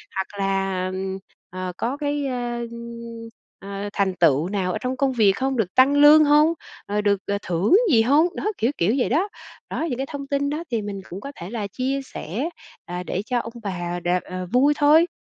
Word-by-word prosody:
hoặc 195 Hz, +1 st, -4 dB
là, 195 Hz, -1 st, 0 dB
ờm, 190 Hz, +1 st, -3 dB, 0.3 s
ờ, 185 Hz, 0 st, -5 dB
có 250 Hz, +4 st, -2 dB
cái, 290 Hz, -1 st, -1 dB
ơ, 240 Hz, -2 st, -3 dB, 0.9 s
ờ, 200 Hz, +1 st, -5 dB
thành 195 Hz, -1 st, +1 dB
tựu 160 Hz, 0 st, +3 dB
nào 190 Hz, -2 st, -1 dB
ở -, -, -2 dB
trong 255 Hz, +1 st, -2 dB
công 275 Hz, 0 st, +2 dB
việc 215 Hz, -5 st, +5 dB
không, 265 Hz, +2 st, -1 dB
được 195 Hz, -6 st, -1 dB
tăng 265 Hz, +2 st, +6 dB
lương 295 Hz, +2 st, +8 dB
hông, 300 Hz, +3 st, +5 dB, 0.3 s
ờ, 210 Hz, +1 st, -1 dB
được 200 Hz, -1 st, +1 dB, 0.2 s
thưởng 180 Hz, -, +2 dB, 0.2 s
gì 225 Hz, -4 st, +6 dB
hông? 285 Hz, +8 st, +4 dB
Đó, -, -, -4 dB
kiểu 230 Hz, +4 st, +1 dB
kiểu 200 Hz, +9 st, +2 dB
vậy 255 Hz, -, +1 dB
đó. 350 Hz, -, +1 dB, 0.4 s
Đó, -, -, -2 dB
những 245 Hz, -, -2 dB
cái 270 Hz, +1 st, -3 dB
thông 280 Hz, -2 st, -6 dB
tin 280 Hz, 0 st, 0 dB
đó 305 Hz, +3 st, -3 dB
thì 230 Hz, -2 st, 0 dB
mình 200 Hz, -1 st, -5 dB
cũng 185 Hz, +3 st, -7 dB
có 280 Hz, -, -7 dB
thể 170 Hz, -, -8 dB
là 215 Hz, -3 st, -3 dB
chia 260 Hz, +6 st, -2 dB
sẻ, 250 Hz, -, -4 dB, 0.4 s
ờ, 180 Hz, 0 st, -5 dB
để 180 Hz, -, -2 dB
cho 245 Hz, 0 st, 0 dB
ông 230 Hz, 0 st, -6 dB
bà 175 Hz, -3 st, -3 dB
đ 175 Hz, -, -6 dB, 0.2 s
ờ, 185 Hz, 0 st, -6 dB
vui 280 Hz, +4 st, +5 dB
thôi. 305 Hz, +3 st, +5 dB
225 Hz, 210 wpm, -23 LUFS, 190-275 Hz, 0.9 s, lương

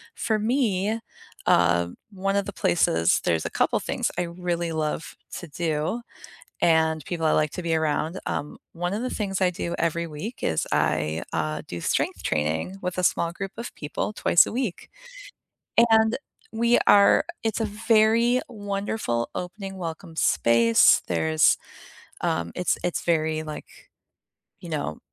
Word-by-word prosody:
for 220 Hz, -2 st, 0 dB
me, 220 Hz, -2 st, 0 dB, 0.5 s
uh, 85 Hz, 0 st, +3 dB, 0.2 s
one 195 Hz, 0 st, -1 dB
of 200 Hz, -1 st, +1 dB
the 205 Hz, -, -6 dB
places 85 Hz, -, +2 dB
there's 80 Hz, -2 st, +1 dB
a -, -, -1 dB
couple -, -, +1 dB
things -, -, -2 dB
I 180 Hz, -, +1 dB
really 175 Hz, -1 st, -3 dB
love 155 Hz, 0 st, -3 dB, 0.2 s
to 175 Hz, -, -9 dB
do, 160 Hz, +7 st, -2 dB, 0.6 s
and 160 Hz, -2 st, +3 dB
people 165 Hz, 0 st, -2 dB
I 155 Hz, -, +3 dB
like 155 Hz, -1 st, +2 dB
to 180 Hz, -, -5 dB
be 165 Hz, -1 st, 0 dB
around, 160 Hz, +3 st, -1 dB
um, 145 Hz, -, -3 dB, 0.2 s
one 175 Hz, +2 st, -3 dB
of 215 Hz, -, -2 dB
the 255 Hz, -, -2 dB
things 195 Hz, -3 st, -2 dB
I 185 Hz, -1 st, +3 dB
do 170 Hz, -1 st, -4 dB
every 170 Hz, 0 st, 0 dB
week 165 Hz, +10 st, -7 dB
is 80 Hz, -, 0 dB
I, 80 Hz, +1 st, +1 dB
uh, 75 Hz, -1 st, -2 dB
do 85 Hz, -, -6 dB
strength -, -, -1 dB
training 80 Hz, -, -1 dB
with 180 Hz, 0 st, -3 dB
a -, -, +1 dB
small 170 Hz, -1 st, +1 dB
group 195 Hz, +2 st, -5 dB
of 235 Hz, -, -7 dB
people 150 Hz, +7 st, -4 dB
twice 175 Hz, -4 st, +5 dB
a -, -, -5 dB
week, 235 Hz, -6 st, -3 dB, 1.0 s
and 220 Hz, 0 st, +4 dB, 0.3 s
we 235 Hz, +2 st, +3 dB
are 200 Hz, -1 st, +6 dB, 0.2 s
it's 225 Hz, +1 st, -1 dB
a -, -, +1 dB
very 225 Hz, +3 st, +3 dB
wonderful 200 Hz, -, -2 dB
opening 195 Hz, +2 st, -6 dB
welcome 165 Hz, -1 st, -6 dB
space, 115 Hz, -5 st, +4 dB
there's, 80 Hz, -2 st, +3 dB, 0.7 s
um, 85 Hz, 0 st, -1 dB
it's 180 Hz, -, 0 dB
it's 175 Hz, -, -1 dB
very, 155 Hz, -2 st, +1 dB
like, 155 Hz, -1 st, -7 dB, 0.9 s
you -, -, -9 dB
know, 75 Hz, +2 st, -3 dB
170 Hz, 155 wpm, -25 LUFS, 150-205 Hz, 1.0 s, are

